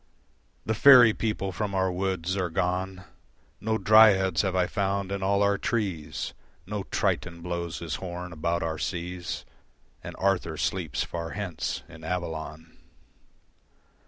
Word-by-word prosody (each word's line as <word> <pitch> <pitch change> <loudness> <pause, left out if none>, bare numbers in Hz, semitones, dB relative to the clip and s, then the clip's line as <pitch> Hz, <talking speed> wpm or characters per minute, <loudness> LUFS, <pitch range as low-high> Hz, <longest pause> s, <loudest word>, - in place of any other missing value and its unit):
The 110 - 0
faerie 120 -1 +8
people 105 -3 -2
from 100 +2 -3
our 95 -1 +1
woods 95 -1 -1
are 90 -3 -1
gone, 90 +3 -2 0.6
No 110 +1 0
Dryads 100 -4 +6
have 95 -2 -1
I 90 -1 +3
found 100 0 -1
in 100 0 -2
all 100 +1 +2
our 100 0 +2
trees, 90 -11 -2 0.3
No 105 +1 -3
Triton 85 -2 -1
blows 85 -1 -4
his 85 -3 -4
horn 90 -1 -6
about 85 +2 -1
our 80 -1 -3
seas 90 -1 -4 0.6
And - - -7
Arthur 90 -5 0
sleeps 85 -3 -1
far 85 -1 -5
hence 95 -6 -3
in 80 0 -13
Avalon. 80 -2 -5
90 Hz, 135 wpm, -27 LUFS, 85-100 Hz, 0.6 s, faerie